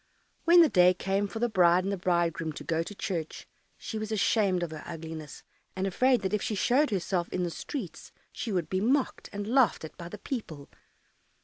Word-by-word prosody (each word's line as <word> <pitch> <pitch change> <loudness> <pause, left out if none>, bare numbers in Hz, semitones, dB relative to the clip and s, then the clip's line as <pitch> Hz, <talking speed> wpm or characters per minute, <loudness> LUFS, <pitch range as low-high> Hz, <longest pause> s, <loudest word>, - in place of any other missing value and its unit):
When 345 0 +8
the - - +5
day 180 -3 +5
came 195 +2 -1
for 225 - -7
the 240 +2 +1
bride 180 -4 +4
and 195 +1 -1
the - - -2
bridegroom 170 -3 0
to - - -8
go 165 0 0
to 205 +5 -7
church, 170 -5 -4 0.3
she 220 - -5
was 215 0 -5
ashamed 200 -3 +2
of 170 - -4
her 155 -1 -7
ugliness, 160 -2 -8 0.3
and 190 0 -1
afraid 250 +5 +2
that 190 - -2
if 210 - +1
she 215 - -2
showed 265 +9 +3
herself 185 -3 -1
in 180 - -2
the 175 - -2
streets, 195 - -7 0.2
she 230 - -5
would 180 -5 -1
be 185 0 -1
mocked 260 +5 0
and 205 0 -4
laughed 235 -7 +2
at 160 - -11
by 170 -1 -8
the 210 - -8
people. 175 - -6
190 Hz, 210 wpm, -29 LUFS, 170-215 Hz, 0.3 s, When